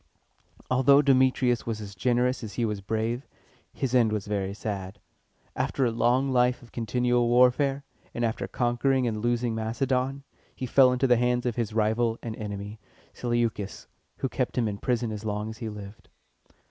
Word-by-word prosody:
Although 140 Hz, +3 st, +5 dB
Demetrius 130 Hz, -3 st, +3 dB
was 110 Hz, -2 st, -2 dB
as 100 Hz, -2 st, -8 dB
generous 125 Hz, +5 st, +1 dB
as 110 Hz, -, -7 dB
he 120 Hz, -, 0 dB
was 105 Hz, -2 st, -3 dB
brave, 110 Hz, +5 st, -2 dB, 0.4 s
his 130 Hz, -2 st, -3 dB
end 120 Hz, -4 st, +4 dB
was 105 Hz, -2 st, -2 dB
very 100 Hz, -2 st, -2 dB
sad. 100 Hz, -1 st, -5 dB, 0.6 s
After 135 Hz, -, 0 dB
a 120 Hz, -, +1 dB
long 120 Hz, +4 st, +2 dB
life 125 Hz, 0 st, +2 dB
of 120 Hz, -, -16 dB
continual 120 Hz, +1 st, +1 dB
warfare, 125 Hz, +3 st, +3 dB, 0.3 s
and 120 Hz, -, -1 dB
after 115 Hz, -, -2 dB
conquering 125 Hz, +2 st, +1 dB
and 110 Hz, -3 st, -2 dB
losing 120 Hz, 0 st, 0 dB
Macedon, 130 Hz, +4 st, -1 dB, 0.3 s
he 130 Hz, -, -4 dB
fell 130 Hz, +1 st, +5 dB
into 125 Hz, +1 st, +1 dB
the 125 Hz, -2 st, +4 dB
hands 125 Hz, +1 st, +1 dB
of 120 Hz, -2 st, -1 dB
his 115 Hz, -3 st, -2 dB
rival 110 Hz, +1 st, +1 dB
and 115 Hz, -2 st, -4 dB
enemy, 105 Hz, 0 st, -6 dB, 0.3 s
Seleucus, 120 Hz, -4 st, -2 dB, 0.3 s
who -, -, -1 dB
kept -, -, -2 dB
him 120 Hz, -3 st, +2 dB
in 100 Hz, -1 st, -4 dB
prison 120 Hz, -2 st, -1 dB
as 105 Hz, 0 st, -6 dB
long 105 Hz, 0 st, -3 dB
as 110 Hz, -, -11 dB
he 115 Hz, -3 st, -4 dB
lived. 105 Hz, 0 st, -10 dB
120 Hz, 170 wpm, -27 LUFS, 110-125 Hz, 0.6 s, Although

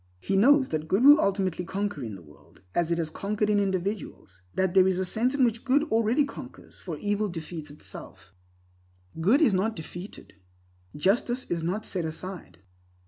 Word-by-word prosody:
He 195 Hz, -, -2 dB
knows 265 Hz, +7 st, +5 dB
that 155 Hz, 0 st, -3 dB
good 195 Hz, +8 st, +2 dB
will 290 Hz, +2 st, +9 dB
ultimately 190 Hz, -3 st, 0 dB
conquer 200 Hz, -3 st, -3 dB
in 110 Hz, -4 st, -5 dB
the 90 Hz, -, -12 dB
world, 75 Hz, -1 st, -20 dB
as 170 Hz, -1 st, +1 dB
it 170 Hz, -, +1 dB
has 160 Hz, -2 st, -2 dB
conquered 210 Hz, +4 st, -1 dB
in 205 Hz, -, +3 dB
individuals; 190 Hz, -, -3 dB
that 190 Hz, -2 st, +1 dB
there 190 Hz, -1 st, +6 dB
is 190 Hz, -1 st, +1 dB
a 190 Hz, -, 0 dB
sense 235 Hz, +8 st, 0 dB
in 265 Hz, -3 st, +4 dB
which 230 Hz, -1 st, -1 dB
good 280 Hz, +2 st, +3 dB
already 230 Hz, +6 st, +3 dB
conquers, 280 Hz, -, -11 dB
for -, -, -6 dB
evil 205 Hz, 0 st, -1 dB
defeats 165 Hz, -2 st, -7 dB
itself. 95 Hz, -, -10 dB, 0.9 s
Good 215 Hz, -, +4 dB
is 235 Hz, -9 st, +4 dB
not 210 Hz, +4 st, 0 dB
defeated; 175 Hz, +4 st, -9 dB, 0.6 s
justice 240 Hz, -, +1 dB
is 170 Hz, -1 st, 0 dB
not 185 Hz, +6 st, -2 dB
set 180 Hz, -3 st, -1 dB
aside. 160 Hz, -, -7 dB
195 Hz, 180 wpm, -27 LUFS, 165-220 Hz, 0.9 s, will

